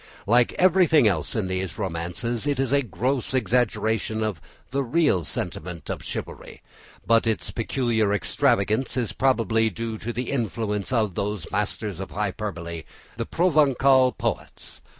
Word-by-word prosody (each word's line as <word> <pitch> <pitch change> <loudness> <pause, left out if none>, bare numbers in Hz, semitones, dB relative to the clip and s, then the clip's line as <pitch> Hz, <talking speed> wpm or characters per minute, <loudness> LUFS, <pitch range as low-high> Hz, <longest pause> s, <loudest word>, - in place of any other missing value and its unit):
Like 120 +3 +4
everything 175 - +5
else 80 -7 0
in 105 -4 0
these 95 -1 -3
romances, 100 - -3
it 140 -2 0
is 135 0 +1
a 140 - +4
gross 125 +5 -1
exaggeration 110 -2 +1
of 105 -8 -3 0.3
the 140 +1 0
real 135 - +2
sentiment 85 +2 -4
of - - -5
chivalry, - - -7 0.4
but 115 +1 +3
its 110 -2 -1
peculiar 115 -1 0
extravagance 105 +4 +1
is 120 -4 -1
probably 115 -4 +2
due 110 +2 -5
to 120 - -4
the 120 +2 -3
influence 110 -5 -2
of 110 -6 +1
those 100 -2 -3
masters 105 -2 -2
of 95 - -5
hyperbole, 95 -5 -4 0.4
the 115 - -3
Provencal 140 -6 +4
poets. - - -4
110 Hz, 140 wpm, -25 LUFS, 100-130 Hz, 0.4 s, everything